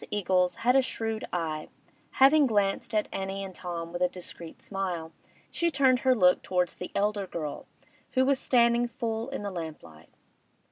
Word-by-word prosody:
Eagles 185 -3 +1
had 250 +1 +5
a 270 - +6
shrewd 225 -3 -3
eye; 160 -3 -3 0.4
having 280 +2 +6
glanced 205 -1 0
at 210 - +1
Annie 195 0 -4
and 190 -1 -7
Tom 170 -2 -6
with 175 - -4
a 180 - +3
discreet 175 -2 -8
smile, 180 -5 -4 0.4
she 340 - +1
turned 265 -4 +3
her 260 0 +3
look 180 -5 +4
towards 180 -1 0
the 180 - -7
elder 205 -1 0
girl, 155 -5 -5 0.5
who 260 0 +3
was 275 0 +2
standing 235 -1 +3
full 230 -1 -3
in 275 -6 -5
the 200 - -3
lamplight. 150 - -8
195 Hz, 170 wpm, -28 LUFS, 180-240 Hz, 0.5 s, a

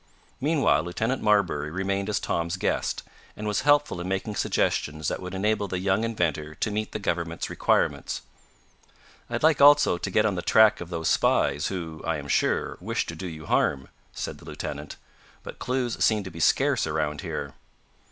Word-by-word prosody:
Meanwhile 140 - +2
Lieutenant 110 +10 -2
Marbury 100 -9 +2
remained 95 +4 -2
as 105 - +1
Tom's 85 0 -2
guest, - - -1 0.3
and 105 - -5
was 105 - 0
helpful 145 -10 +3
in 90 - -5
making 95 +2 -2
suggestions 75 -5 0
that - - -4
would 90 +1 -6
enable 105 +1 0
the 90 - -3
young 95 +3 +1
inventor 80 -9 -1
to 105 - -2
meet 105 +1 -2
the - - -3
government's 85 -3 -3
requirements. - - 0 1.1
"I'd - - -3
like, 155 -3 +4
also, 145 -10 +6
to 100 - -3
get 105 +3 +2
on 105 - +2
the 90 - -3
track 110 +2 +5
of 85 - -7
those 80 -2 -3
spies 75 - +2
who, 85 -4 -5
I 80 -1 -1
am 70 -1 -8
sure, - - 0
wish - - -1
to 85 - -6
do 90 +3 -6
you 80 -2 -8
harm," 65 -2 +1 0.2
said - - -5
the - - -15
lieutenant, 75 +1 -6 0.5
"but - - -9
clues 125 -2 -1
seem 110 -2 +3
to 95 - -8
be 85 - -9
scarce - - +2
around 75 -1 -1
here." - - -5
95 Hz, 180 wpm, -26 LUFS, 80-110 Hz, 1.1 s, also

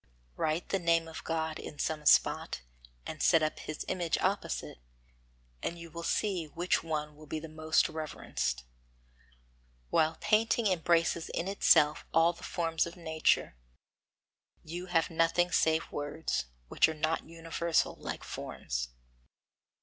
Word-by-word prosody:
Write 155 +2 -1
the 195 - +1
name 165 -1 +2
of 160 - -8
God 160 -1 -2
in 150 - -8
some 150 0 -1
spot, - - +4 0.4
and 155 - -6
set 165 -3 +5
up 155 - -1
His 155 - -5
image 175 -3 0
opposite, 185 - -2 0.8
and 170 - -3
you 170 -1 -10
will 170 - -6
see 180 0 0
which 175 +4 0
will 150 -1 -4
be 155 +2 -3
the 160 - -8
most 155 +3 +2
reverenced. 155 - -3 1.3
While 160 +1 +3
painting 225 +2 +2
embraces 170 -3 +2
in 175 - -2
itself 150 -6 +4
all 165 +1 +5
the - - -15
forms 165 -2 0
of 170 - -9
nature, 160 - +1 1.1
you 175 +3 -6
have 165 -2 +1
nothing 165 +2 +2
save 160 -1 +2
words, 145 - -2 0.2
which - - +4
are 160 - -4
not 155 +1 -1
universal, 165 0 0
like - - -6
forms. - - -4
165 Hz, 135 wpm, -31 LUFS, 155-170 Hz, 1.3 s, set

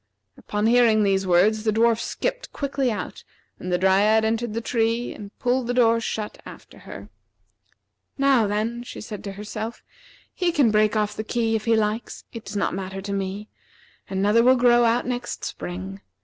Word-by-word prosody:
Upon 210 +1 -3
hearing 230 -2 +4
these 195 -1 +1
words 205 +5 +3
the 220 - +2
dwarf 225 +1 +3
skipped - - -3
quickly 275 -3 -1
out, 205 -4 -6 0.4
and 180 - -5
the 180 - +2
Dryad 200 +4 +3
entered 225 0 -1
the - - 0
tree 230 +1 -1
and 205 - -9
pulled 250 0 0
the 245 - -1
door 230 -2 +4
shut 215 -2 -4
after - - -13
her. - - -9 1.1
"Now, 270 -5 +3
then," 220 +4 -2
she 245 - -9
said 210 -1 -8
to 200 - -5
herself, 215 +3 -6 0.5
"he 360 -1 0
can 280 -9 +3
break 215 0 +3
off 210 -1 0
the 215 - -4
key 225 0 0
if 215 - -3
he 230 -1 +3
likes. 220 +1 -2
It 230 -2 -8
does 205 - -7
not - - 0
matter 190 +1 -5
to 200 0 -4
me. 195 +2 -4 0.6
Another 205 +4 +3
will 255 +2 +5
grow 240 -1 +5
out 235 +1 +2
next 245 0 -4
spring. 90 +2 -6
220 Hz, 180 wpm, -24 LUFS, 205-240 Hz, 1.1 s, will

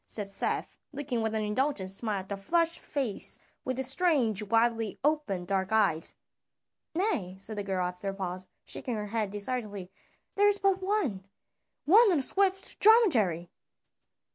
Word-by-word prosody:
said 210 -2 -4
Seth, 195 - -2
looking 275 -5 -3
with 220 0 -1
an 215 - -1
indulgent 210 -2 -1
smile 205 0 -3
at 190 - -15
the 200 - -2
flushed 335 - 0
face 265 -9 +1 0.3
with 255 -1 -3
its 265 -1 +2
strange 265 - +1
widely 225 0 +1
opened 290 -12 0
dark 190 +1 -1
eyes. 195 -8 +1 0.8
"Nay," 325 - -1
said 215 +3 -1
the 205 - -3
girl 190 -2 -2
after 180 +2 -5
a 195 - -1
pause, 185 -1 -5 0.2
shaking 245 - -3
her 210 -1 -4
head 215 -1 -2
decidedly; 205 -3 -2 0.4
"there 410 +1 +3
is 410 0 +4
but 390 -1 +1
one 370 - -1 0.6
one 415 +6 +6
on 345 - +2
a 275 - 0
swift 385 +4 0
dromedary." 235 - +4
220 Hz, 160 wpm, -29 LUFS, 195-300 Hz, 0.8 s, one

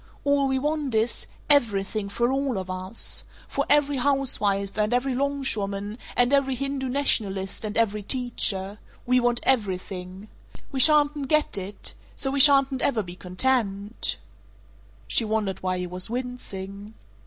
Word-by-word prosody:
All 280 -1 +2
we 265 0 0
want 295 -2 -1
is 220 +2 0 0.2
everything 215 -7 +2
for 235 +5 0
all 270 -4 -1
of 185 -1 -4
us! 185 +4 -3 0.2
For - - -2
every 290 -1 +4
housewife 230 -8 0
and 210 +1 0
every 260 +1 0
longshoreman 220 -6 -2 0.2
and 245 +2 +4
every 270 -2 +2
Hindu 275 0 -3
nationalist 205 -9 0
and 215 0 -2
every 210 -2 +1
teacher. 205 -4 0 0.3
We 250 +1 +3
want 240 -1 +1
everything. 190 -4 -1 0.4
We 270 - -3
shatn't 295 -1 +5
get 305 +1 +1
it. 195 +1 -5 0.2
So 270 - -2
we 280 - -1
shatn't 275 -1 +5
ever 230 -6 +1
be 175 -1 -9
content 200 +2 -1 0.5
" - - -28
She - - +5
wondered 215 -3 -2
why 185 0 -1
he 180 - -3
was 180 +2 -4
wincing. 215 -4 -6
235 Hz, 145 wpm, -25 LUFS, 200-270 Hz, 0.5 s, shatn't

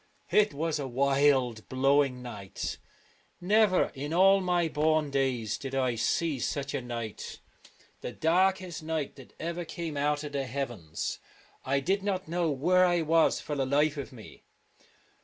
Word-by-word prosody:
It 210 0 +4
was 155 +1 -2
a 140 - -3
wild 135 -3 +2
blowing 135 -1 +2
night. 105 -6 -6 0.6
Never 205 +1 +3
in 145 +3 -4
all 195 +2 +6
my 175 -2 +1
born 155 -1 +1
days 130 -6 0
did 135 -1 -5
I 130 -2 +1
see 145 +5 0
such 140 +2 -2
a 140 - -1
night 115 -3 -6 0.3
— - - -31
the - - -5
darkest 185 +3 +1
night 155 -2 -3
that 135 - -14
ever 170 +2 -3
came 160 -2 -5
out 145 +1 0
of 150 - -6
the 140 -2 -2
heavens. 115 - -4 0.4
I 140 +1 0
did 195 +7 0
not 195 -1 -2
know 170 0 0
where 175 +6 +3
I 175 -2 +3
was 165 +1 +3
i54 - - -11
for 150 - -3
the 135 -2 0
life 145 +3 +2
of 140 0 -5
me. 115 -4 -13
145 Hz, 165 wpm, -29 LUFS, 130-170 Hz, 0.6 s, all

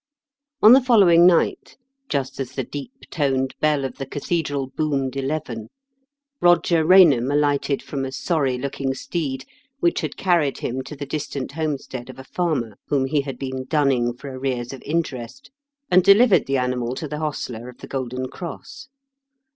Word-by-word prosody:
On 215 +3 +10
the 265 - +7
following 190 -9 +6
night, 175 -2 +1 0.3
just 140 -2 -2
as 130 -1 -4
the 135 - -2
deep 190 - -9
toned 135 -4 0
bell 150 -3 +1
of 130 - -6
the 135 - -4
cathedral 145 -1 -2
boomed 140 -4 -1
eleven, 135 -5 -3 0.7
Eoger 175 -2 +4
Eainham 155 -9 +6
alighted 145 -1 +1
from 140 -2 -4
a - - -2
sony 135 -2 -1
looking 135 0 -3
steed, 135 -3 -4 0.3
which 345 +2 +1
had - - -5
carried 170 -7 +1
him 130 +2 -3
to 150 - -8
the 145 0 -6
distant 140 -2 -4
homestead 140 -5 -4
of 130 - -10
a 130 - -9
farmer, 135 - -2
whom 140 -3 +1
he 145 +2 +1
had 135 -2 -6
been 130 -1 -5
dunning 135 -5 +1
for 130 +3 -9
arrears 130 -2 -3
of 135 - -9
interest, 150 - -4 0.4
and 185 0 +6
delivered 205 +2 +5
the 135 0 +1
animal 125 -1 -1
to 155 - -5
the 150 +1 -5
hostler 125 -6 -4
of 125 - -13
The - - -11
Golden 130 -1 -4
Cross. 260 - -9
140 Hz, 165 wpm, -22 LUFS, 130-160 Hz, 0.7 s, On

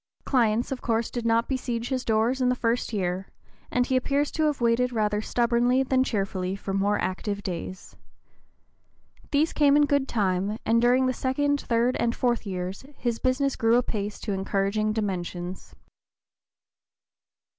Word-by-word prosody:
Clients 235 -2 +2
of 265 - -3
course 230 0 0
did 240 -2 -3
not 230 +1 +2
besiege 245 -3 -2
his 260 -2 -1
doors 230 +4 +1
in 250 - +3
the 250 - +2
first 235 0 -1
year, 185 -2 -2 0.4
and 250 0 +1
he 260 - 0
appears 280 +3 +1
to 315 - 0
have 300 -2 0
waited 240 +1 +2
rather 210 -2 0
stubbornly 240 +3 +2
than 260 0 +2
cheerfully 195 -5 -2
for 195 0 -5
more 200 +1 +1
active 200 +2 -3
days. 185 0 -6 1.3
These 300 +3 +2
came 290 -1 +4
in 295 - +5
good 280 -1 +1
time, 200 -2 0
and 230 +1 +3
during 250 +2 +4
the 255 - +1
(p. - - -12
018) - - -13
second, 285 +2 +1
third, 240 +1 +1
and 235 0 +1
fourth 240 -3 0
years, 185 +2 -4
his 235 -2 -2
business 270 +1 +1
grew 225 0 +3
apace 210 -4 -2
to 205 - -2
encouraging 200 +2 0
dimensions. 185 -4 -4
230 Hz, 165 wpm, -26 LUFS, 205-255 Hz, 1.3 s, in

